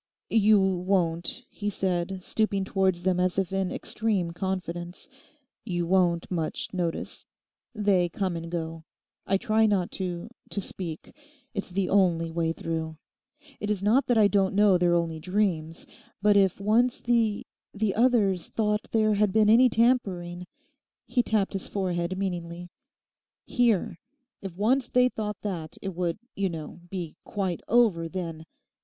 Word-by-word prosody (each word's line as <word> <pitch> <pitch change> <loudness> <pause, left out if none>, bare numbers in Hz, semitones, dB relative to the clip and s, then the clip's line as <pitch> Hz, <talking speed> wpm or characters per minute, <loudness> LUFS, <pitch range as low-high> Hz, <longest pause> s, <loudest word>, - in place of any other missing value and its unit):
'You 215 -1 +5
won't,' 180 +1 0
he 205 -1 -4
said, 185 -1 -2
stooping 200 -2 0
towards 190 -3 +1
them 185 -1 +1
as 180 0 +1
if 195 -1 -1
in 195 -1 0
extreme 205 -6 -1
confidence, 175 -1 -4 0.6
'you 175 -2 -2
won't 175 -1 +2
much 165 +1 -3
notice? 175 -3 -3 0.5
They 195 -4 +2
come 185 0 -2
and 165 0 -5
go. 165 -1 -4 0.4
I 195 - +3
try 220 0 +2
not 195 -4 +1
to—to 190 +4 -5
speak. 175 -4 -6 0.4
It's 200 - -4
the 185 +1 -1
only 170 -4 +2
way 165 0 0
through. 160 -1 -4 0.6
It 210 - -3
is 205 -2 -1
not 235 +7 +3
that 245 - +3
I 210 -2 +6
don't 195 -1 +1
know 205 -2 +5
they're 175 -1 +3
only 165 -2 -1
dreams. 180 -3 -1 0.3
But 205 +1 +4
if 195 -2 +3
once 225 +5 +2
the—the 220 -3 -1
others 215 -7 +2
thought 210 -1 -1
there 215 -1 +3
had 205 -1 +2
been 215 +1 +4
any 250 +3 +7
tampering'—he 195 -1 -1
tapped 215 -4 0
his 195 - -4
forehead 180 -2 -2
meaningly—'here: 180 +3 -3 0.4
if 185 -3 -7
once 245 +5 +2
they 250 0 +4
thought 210 -3 -5
that, 170 -7 -5
it 195 -1 -5
would, 170 -1 -1 0.2
you 195 -1 0
know, 165 0 -7
be 175 -4 -5
quite 190 -4 -3
over 205 -8 +3
then. 165 -3 -5
190 Hz, 140 wpm, -27 LUFS, 175-210 Hz, 0.6 s, any